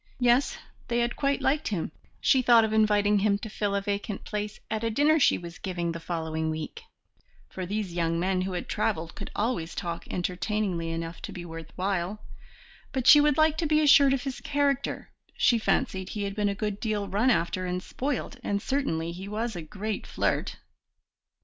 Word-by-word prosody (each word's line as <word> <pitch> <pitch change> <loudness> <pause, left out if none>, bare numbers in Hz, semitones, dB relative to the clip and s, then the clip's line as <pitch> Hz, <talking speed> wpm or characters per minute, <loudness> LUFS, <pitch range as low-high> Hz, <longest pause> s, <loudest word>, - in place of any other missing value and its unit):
Yes, 245 +2 +3 0.3
they 235 - 0
had 240 0 +1
quite 280 -1 0
liked 295 +3 +1
him; 175 -7 -2 0.3
she 260 - +4
thought 235 -2 +6
of 215 - -2
inviting 210 -1 +4
him 200 0 +2
to 215 +1 -8
fill 205 -2 -1
a 200 - +1
vacant 205 +1 -3
place 210 0 -4
at 220 0 -1
a 230 - +1
dinner 295 +7 +3
she - - +4
was 170 0 -9
giving 175 -3 -2
the 165 - -5
following 160 -1 -2
week, 160 - -5 0.7
for 185 -1 -5
these 205 -2 -3
young 165 -1 0
men 185 +1 +1
who 185 0 -2
had 180 - -4
travelled 180 -7 -1
could 200 - -7
always 205 -7 -1
talk 170 -3 -4
entertainingly 180 -1 -1
enough 165 0 -5
to - - -6
be 175 -1 -7
worth 165 -1 -8
while; 190 +1 -1 0.7
but 260 -3 -2
she 295 +3 +9
would 295 -1 +3
like 315 0 +3
to 330 - +1
be 305 0 +4
assured 285 -2 +7
of 260 - -4
his 270 -2 -5
character; 280 -2 -1 0.3
she 235 - +4
fancied 190 -3 0
he 210 - -3
had 200 0 -3
been 205 0 +1
a 200 - -2
good 210 0 -3
deal 210 -3 -1
run 205 +7 +2
after 185 -2 +1
and 180 0 -2
spoilt, 270 -2 -3
and 200 0 0
certainly 200 - -1
he 185 +3 -7
was 220 +1 -3
a 175 - -4
great 205 +6 -5
flirt. - - -1
205 Hz, 195 wpm, -27 LUFS, 175-240 Hz, 0.7 s, she